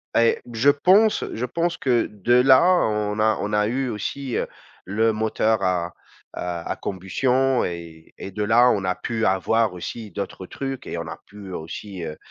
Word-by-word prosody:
et 115 0 +4
je 115 +5 +4
pense 190 +9 +4
je 120 - -2
pense 170 +7 -1
que 125 -3 +2
de 105 +3 0
là 130 +2 +6 0.2
on 105 -1 -1
a 110 0 +3
on 105 +1 -3
a 105 0 +3
eu 130 +3 -1
aussi, 120 +4 -4
heu, - - -1 0.4
le 110 +4 +1
moteur 110 -1 0
à 90 -2 0 0.4
à 85 -1 -4
combustion 125 +8 0
et 85 -2 -8
et - - -6
de 105 +2 -3
là, 120 +4 +5
on 100 -5 +1
a 90 - +1
pu 110 +4 -2
avoir 105 +3 +2
aussi 105 +4 -7
d'autres 95 0 -6
trucs 135 -2 -5
et - - -4
on - - -5
a - - -7
pu 100 -2 -11
aussi, 90 +3 -7
heu 80 - -4
heu, 75 - -11
110 Hz, 185 wpm, -23 LUFS, 95-125 Hz, 0.4 s, là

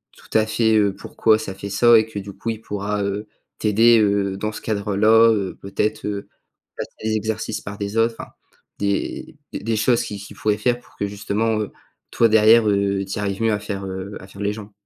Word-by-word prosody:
tout - - -2
à 110 - +3
fait, 110 0 +2
heu, 100 -2 +3
pourquoi 110 -1 +2
ça 95 - -5
fait 100 +1 -7
ça 120 +3 +6
et 110 - 0
que, 110 -2 -6
du 100 0 -8
coup, 115 - -5
il 110 -1 -7
pourra, 105 -1 -3
heu, 100 +2 -3 0.3
t'aider, 115 +2 +5
heu, 100 -2 +1
dans 105 +2 -2
ce - - -7
cadre-là, 110 +2 +4
heu, 100 -4 -2
peut-être, 105 +2 -2
heu, 100 -1 -4 0.5
remplacer - - -5
les 110 0 0
exercices 110 0 -3
par 100 +1 -7
des 100 +1 -4
autres, 115 0 +2 0.6
des 100 -1 -2 0.2
des - - -3
des 115 +1 -1
choses 115 +2 +2
qu'il 105 - -6
qu'il 100 - -11
pourrait 105 -1 0
faire 120 +3 0
pour - - -23
que, 100 - -1
justement, 105 +2 -1
heu, 105 - -4 0.4
toi, 115 - +4
derrière, 110 +1 +6
heu, 100 -1 +1
tu 95 - -5
y - - -2
arrives 100 0 -2
mieux 110 -1 +3
à 105 - -1
faire, 100 -2 -5
heu, 95 +1 -6
à 95 - -12
faire 100 +1 -11
les 100 0 0
jambes. 105 -1 -9
105 Hz, 220 wpm, -21 LUFS, 100-110 Hz, 0.6 s, ça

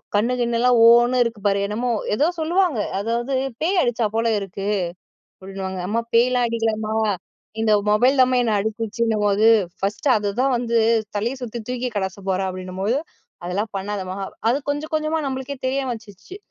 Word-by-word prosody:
கண்ணு 230 +5 +2
கிண்ணுலாம் 240 +1 +2
ஓன்னு 240 +2 +5
இருக்கு 230 -2 -4
பாரு. 200 0 +2
என்னமோ 230 +5 -2 0.3
ஏதோ 295 +8 +2
சொல்லுவாங்க. 340 - +1 0.2
அதாவது 235 +5 -2 0.3
பேய் 355 +3 +2
அடிச்சா 240 -3 0
போல 230 +1 +1
இருக்கு, 195 0 -6 0.7
அப்டின்னுவாங்க. 190 -1 -5
அம்மா 225 +3 0
பேய்லாம் 245 +1 +4
அடிக்கலமா. 220 -2 -1 0.7
இந்த 220 -1 +2 0.2
மொபைல் 250 +6 +3
தான்மா 255 0 +4
என்ன 230 -2 0
அடிச்சிருச்சுன்னும்போது, 220 -1 0 0.3
ஃபர்ஸ்ட் 200 +8 -1
அததான் 220 +6 0
வந்து 235 -1 -1 0.4
தலைய 230 +5 -1
சுத்தி 240 -1 -5
தூக்கி 250 0 -2
கடாச 190 -2 -2
போறேன் 190 0 0
அப்டின்னும்போது 185 +5 -2 0.5
அதெல்லாம் 200 +5 -2
பண்ணாதமா, 195 -1 -4 0.3
அது 245 +4 +2
கொஞ்சம் 290 +2 -3
கொஞ்சமா 310 +1 0
நம்மளுக்கே 265 +1 -4
தெரிய 265 +1 0
வந்துச்சு. 220 - -9
230 Hz, 140 wpm, -22 LUFS, 205-250 Hz, 0.7 s, ஓன்னு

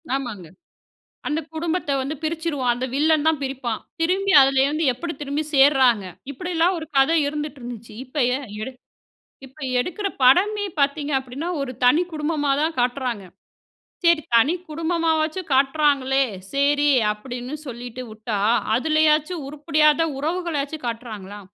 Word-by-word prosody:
ஆமாங்க. 220 -10 -5 0.8
அந்த 305 +1 0
குடும்பத்த 325 0 -2
வந்து 285 +4 -3
பிரிச்சிருவான். 310 -6 -1
அந்த 255 +1 -3
வில்லன் 310 +1 +2
தான் 315 -3 +2
பிரிப்பான். 265 -4 -3 0.2
திரும்பி 385 +4 +1
அதுலேருந்து 275 +4 +2
எப்டி 335 +6 -5
திரும்பி 290 +2 -2
சேர்றாங்க. 265 -7 +5 0.3
இப்டிலாம் 355 +3 0
ஒரு 320 - -6
கதை 285 +5 +4
இருந்துட்டு 295 -1 -5
இருந்துச்சு. 235 -2 -9
இப்ப 255 +4 -11 0.2
எ - - -1 0.2
எடு 265 - -4 0.7
இப்ப 265 +4 -17 0.2
எடுக்குற 365 +9 -2 0.2
படமே 410 +10 +4
பாத்தீங்கன்னா, 280 0 -1
ஒரு 260 -2 -3
தனி 300 +8 +5
குடும்பமா 300 -2 -1
தான் 320 +1 0
காட்டுறாங்க. 245 -4 -1 0.8
சரி 335 -2 +4
தனி 275 +9 +5 0.2
குடும்பமா 330 +1 0
வச்சு 320 +4 -2
காட்டுறாங்களே, 275 -1 +3 0.3
சரி 285 +1 +2 0.2
அப்டின்னு 245 +5 -6
சொல்லிட்டு 245 0 -7
உட்டா 215 -1 -4 0.4
அதுலயாச்சும் 310 +3 +2
உருப்படியான 300 +2 +2
உறவுகளாச்சு 315 -2 -2
காட்டுறாங்களா? 215 -4 -6
290 Hz, 125 wpm, -22 LUFS, 255-320 Hz, 0.8 s, சேர்றாங்க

